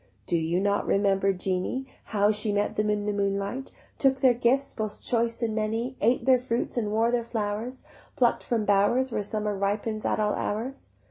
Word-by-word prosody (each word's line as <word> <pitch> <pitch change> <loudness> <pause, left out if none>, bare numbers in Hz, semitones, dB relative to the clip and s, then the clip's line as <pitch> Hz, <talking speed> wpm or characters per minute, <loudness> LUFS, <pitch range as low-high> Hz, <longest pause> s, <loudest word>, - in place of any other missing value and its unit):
Do - - 0
you 165 +2 +1
not 200 +1 0
remember 195 -1 +2
Jeanie, 190 +7 -2 0.2
How 205 -1 +2
she 210 0 +1
met 205 0 0
them 210 0 +1
in 210 -1 0
the 210 - 0
moonlight, 200 +5 -2 0.3
Took 270 -1 +3
their 260 -2 +5
gifts 255 +4 +1
both 215 -2 -4
choice 235 0 -1
and 225 -1 0
many, 225 +4 -2
Ate 235 +4 +2
their 260 -1 +5
fruits 240 -1 -2
and 215 -4 -1
wore 225 +2 +2
their 245 -1 +1
flowers 225 +2 -4 0.3
Pluck'd 240 -2 +2
from 225 -3 -1
bowers 205 +6 +3
Where 210 - -1
summer 210 0 -2
ripens 205 +2 -1
at - - 0
all 210 -1 +1
hours? 240 +6 -4
215 Hz, 190 wpm, -27 LUFS, 205-240 Hz, 0.3 s, their